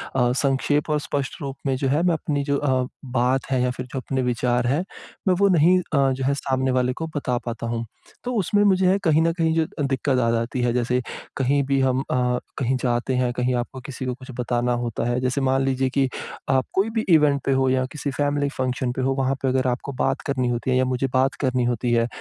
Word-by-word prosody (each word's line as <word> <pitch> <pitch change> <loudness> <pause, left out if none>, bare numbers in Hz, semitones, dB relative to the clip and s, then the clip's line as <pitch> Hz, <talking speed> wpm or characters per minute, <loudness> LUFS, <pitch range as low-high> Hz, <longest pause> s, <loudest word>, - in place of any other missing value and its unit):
अ, 125 -2 +3
संक्षेप 145 +2 +1
और 150 0 +2
स्पष्ट 140 -1 -3
रूप 135 -2 -4
में 135 -1 +1
जो 135 - -1
है 145 +5 +2
मैं 175 -1 +3
अपनी 145 -2 -1
जो 140 0 0
अ, 130 -3 +1 0.3
बात 125 +1 +1
है 130 -1 +2
या 125 0 +1
फिर 125 +1 -6
जो 135 - -1
अपने 130 0 -2
विचार 125 0 0
हैं 145 +7 +1 0.4
मैं 185 - +5
वो 200 - +5
नहीं 175 +1 +5
अ, 140 -6 +1
जो 130 0 -3
है 140 - +3
सामने 130 -1 0
वाले 125 0 +1
को 160 - -2
बता 130 -4 0
पाता 115 -1 -4
हूँ। 115 0 -2 0.4
तो 250 - -3
उसमें 205 0 +2
मुझे 190 -1 +4
कहीं 160 -3 +4
न 165 +1 +3
कहीं 165 -1 +1
जो 165 -1 +2 0.2
दिक्कत 135 -1 0
आ 115 -2 +2
जाती 115 +2 -1
है। 120 -1 +2
जैसे 125 +1 +1 0.4
कहीं 140 +2 +2
भी 135 0 +1
हम 130 -1 +2
अ, 125 -1 +1 0.2
कहीं 130 -1 0
जाते 120 +1 0
हैं 125 -1 +1
कहीं 125 +1 0
आपको 125 +2 -3
किसी 130 0 -6
को 125 - -1
कुछ 130 +1 -11
बताना 120 0 0
होता 115 -1 -2
है, 120 +1 0
जैसे 130 +2 0
मान 135 0 +2
लीजिए 135 0 +1
कि 135 -1 +4 0.4
आप 130 -1 +3
कोई 195 +3 +2
भी 220 - +2
इवेंट 150 -4 +4
पे - - +2
हो 130 0 +2
या 130 0 +2
किसी 145 -1 -4
फ़ेेमिली 145 +1 0
फ़ंक्शन 130 -1 -1
पे 130 - -3
हो 135 +1 +1
वहाँ 135 0 0
पे 135 - 0
अगर 130 0 +1
आपको 125 +3 -2
बात - - 0
करनी 130 -3 0
होती 120 +1 -1
है 130 - +3
या 130 - +3
मुझे 130 +1 0
बात 130 +1 +2
करनी 130 -2 +1
होती 120 0 0
है 115 0 +3
130 Hz, 240 wpm, -23 LUFS, 125-140 Hz, 0.4 s, मैं